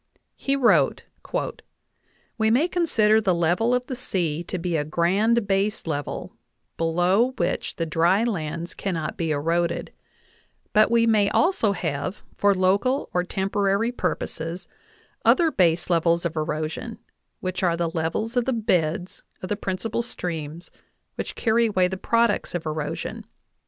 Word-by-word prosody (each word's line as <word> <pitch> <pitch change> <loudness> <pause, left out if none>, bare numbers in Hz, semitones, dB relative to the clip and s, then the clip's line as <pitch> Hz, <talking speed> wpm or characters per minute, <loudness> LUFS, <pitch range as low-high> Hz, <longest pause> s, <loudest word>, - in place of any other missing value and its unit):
He 275 - -1
wrote: 200 - +3 1.4
"We 220 0 +3
may 260 +9 +3
consider 225 -12 +3
the 190 -4 +2
level 175 +8 +2
of 250 0 -1
the 260 - -5
sea 175 - -1
to 185 - -4
be 175 -1 -2
a 150 - +1
grand 195 +9 +2
base 200 +2 0
level, 145 -3 -4 0.4
below 180 +9 +2
which 170 - -1
the 165 - -2
dry 170 +6 +2
lands 170 -6 -3
cannot 165 -6 -3
be 165 -2 -2
eroded; 165 +3 0 0.8
but 215 0 +5
we 230 0 +4
may 215 -3 +3
also 330 - +2
have, 165 0 -3
for 200 -1 +3
local 200 +9 +1
or 180 - +2
temporary 195 +4 0
purposes, 170 -7 -3 0.6
other/ 335 -3 +4
base 170 - +2
levels 170 0 +2
of 170 -1 -2
erosion, 155 +8 -3 0.4
which 185 +1 -3
are 170 -3 +2
the 170 -1 -1
levels 170 +8 -2
of 245 -1 +2
the 265 - +1
beds 180 -6 0 0.2
of 185 - -4
the 210 - 0
prin 190 -2 -3
cipal 225 +3 -2
streams 165 -6 -5 0.4
which - - -5
carry 230 0 +2
away 185 -4 +2
the 190 - -4
products 230 0 +1
of 170 - -3
erosion. 155 -1 -4
185 Hz, 145 wpm, -24 LUFS, 165-220 Hz, 1.4 s, but